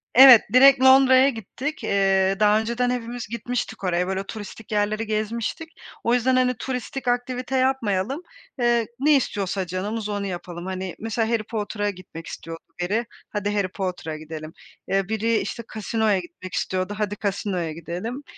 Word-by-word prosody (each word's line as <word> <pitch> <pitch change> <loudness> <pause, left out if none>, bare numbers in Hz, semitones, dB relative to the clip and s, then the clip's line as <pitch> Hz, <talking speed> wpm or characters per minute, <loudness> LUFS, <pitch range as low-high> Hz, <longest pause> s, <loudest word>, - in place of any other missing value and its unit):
Evet, 260 -3 +11
direkt 265 0 +7
Londra'ya 265 0 +7
gittik. 260 +6 -5
Eee, 195 -1 +2
daha 210 0 +5
önceden 235 +2 -1
hepimiz 245 -2 -4
gitmiştik 235 -2 -4
oraya, 180 0 +1
böyle, 190 0 -2
turistik 215 +1 -9
yerleri 210 +1 0
gezmiştik. 225 +9 -2 0.3
O 235 - +2
yüzden, 250 +1 +3
hani, 255 0 +3
turistik 260 0 -4
aktivite 250 +1 -1
yapmayalım. 255 - 0 0.4
Eee, 235 -2 +2
ne 295 +1 +5
istiyorsa 195 -7 -1
canımız 205 +4 -3
onu 205 -1 -2
yapalım. 175 -1 -6
Hani, 185 -1 -4
mesela, 225 0 -1
Harry 230 -2 +1
Potter'a 205 -1 -2
gitmek 180 -4 -9
istiyordu 165 0 -8 0.2
biri, 210 +7 0 0.2
"Hadi, 205 -1 -2
Harry 200 -2 +1
Potter'a 180 -5 -4
gidelim." 155 0 -8 0.3
Eee, 195 0 0
biri, 220 +1 +1
işte, 235 - -4
casino'ya 220 -2 +1
gitmek 180 +1 -10
istiyordu. 185 +2 -1
"Hadi 205 -1 -1
casino'ya 190 -4 -1
gidelim." 180 - -6
215 Hz, 150 wpm, -24 LUFS, 190-245 Hz, 0.4 s, Evet